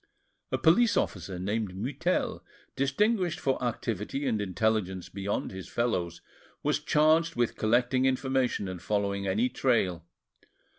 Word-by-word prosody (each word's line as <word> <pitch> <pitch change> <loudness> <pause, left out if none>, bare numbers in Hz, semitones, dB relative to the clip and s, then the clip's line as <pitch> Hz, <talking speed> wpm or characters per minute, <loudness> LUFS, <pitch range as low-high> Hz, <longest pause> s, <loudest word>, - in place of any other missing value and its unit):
A - - +1
police 205 +8 +4
officer 90 0 -2
named 100 +1 -2
Mutel, 140 - -1 0.3
distinguished 175 - +1
for 135 -2 0
activity 115 +2 -2
and 110 -5 0
intelligence 95 -2 -1
beyond 100 +1 -3
his 95 -1 -8
fellows, 90 -8 -1 0.4
was - - +1
charged 160 +2 +3
with 120 -1 0
collecting 125 +4 +2
information 130 -5 0
and 90 -2 -6
following 100 -1 -1
any 105 +6 +2
trail. 110 -10 +1
115 Hz, 120 wpm, -29 LUFS, 100-135 Hz, 0.4 s, police